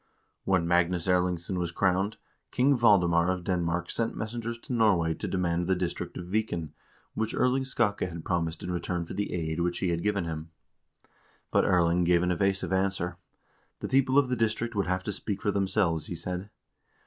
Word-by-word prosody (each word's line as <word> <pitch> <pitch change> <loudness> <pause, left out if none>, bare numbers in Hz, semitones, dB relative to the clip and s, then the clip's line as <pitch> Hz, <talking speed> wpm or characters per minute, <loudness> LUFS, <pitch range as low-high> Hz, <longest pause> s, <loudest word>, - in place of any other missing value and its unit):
1 95 -2 +3
When - - -2
Magnus 85 0 +2
Erlingsson 90 0 +1
was 85 -1 -2
crowned, 95 +3 +1 0.3
King 135 +3 +3
Valdemar 90 -7 +4
of 90 -1 -1
Den 90 -1 0
mark 85 +1 -1
sent 115 -1 -1
messengers 115 +1 -4
to 125 +3 -7
Norway 95 -8 +3
to - - -5
demand 85 -2 0
the 95 - +3
district 90 -1 -4
of 90 - -6
Viken, 90 -5 -2 0.4
which 110 0 -2
Erling 130 +1 +2
Skakke 105 -7 0
had 85 -2 -8
promised 85 -2 -1
in 90 - -3
return 90 -1 -2
for - - -8
the 100 - -2
aid 80 -2 -2
which 85 0 0
he 90 - 0
had 85 -1 -1
given 100 -3 0
him. 80 0 -5 1.0
But - - +3
Erling 85 0 +3
gave 85 0 +3
an 90 - +1
evasive 95 +2 0
answer. 95 -2 0 0.6
The - - -4
people 135 0 +3
of 140 -2 +5
the 125 - +1
district 115 +1 0
would 100 -3 -1
have 95 0 -1
to 105 - -2
speak 100 0 -3
for 105 - 0
themselves, 95 -5 +1
he - - -4
said. 90 +2 -4
90 Hz, 195 wpm, -28 LUFS, 85-105 Hz, 1.0 s, of